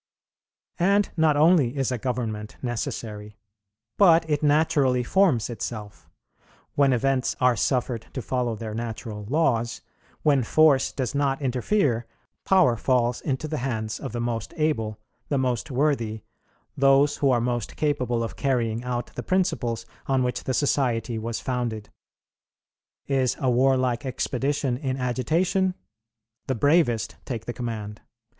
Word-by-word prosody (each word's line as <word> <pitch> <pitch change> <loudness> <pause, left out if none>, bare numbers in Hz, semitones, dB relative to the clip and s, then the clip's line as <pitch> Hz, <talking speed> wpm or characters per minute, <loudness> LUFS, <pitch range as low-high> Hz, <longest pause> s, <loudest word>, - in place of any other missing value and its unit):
"And 200 +3 +3
not 160 -3 +3
only 150 -5 +4
is 135 -2 0
a 125 - -2
government 110 -4 -3
necessary, 105 -3 -4 0.6
but 165 -4 +6
it 150 -2 0
naturally 145 -4 +3
forms 160 - +2
itself.... 110 -3 -7 0.6
When 140 -1 +3
events 130 +1 +1
are 125 -1 +4
suffered 120 +1 -1
to 130 - -3
follow 125 -3 -1
their 110 0 -6
natural 110 -2 -5
laws, 120 -6 +1 0.4
when 140 -3 +4
force 140 +1 +4
does 130 -4 -3
not 140 -1 0
interfere, 125 - 0 0.4
power 185 -11 +4
falls 120 0 +1
into 140 +1 -2
the 155 0 -3
hands 110 -4 -3
of - - -6
the 120 - -4
most 115 -3 -3
able, 115 -9 -1 0.3
the 140 - +1
most 125 0 -1
worthy, 125 -6 0 0.5
those 140 +1 +4
who 140 - +2
are 125 -2 +3
most 120 -1 -2
capable 125 -6 0
of 115 - -5
carrying 120 -4 0
out 125 -1 -4
the - - -5
principles 120 -11 -1 0.2
on 135 -2 +2
which 125 0 -2
the 130 - -1
society 120 -5 0
was 115 +1 -3
founded. 120 -4 -3 1.1
Is 135 -3 +1
a 130 -2 +1
warlike 130 0 +2
expedition 130 0 -1
in 135 -1 -3
agitation? 165 +10 0 0.7
The 130 - 0
bravest 145 -3 +2
take 115 -4 -5
the 120 - -4
command. 110 -4 -5
125 Hz, 135 wpm, -25 LUFS, 115-145 Hz, 1.1 s, but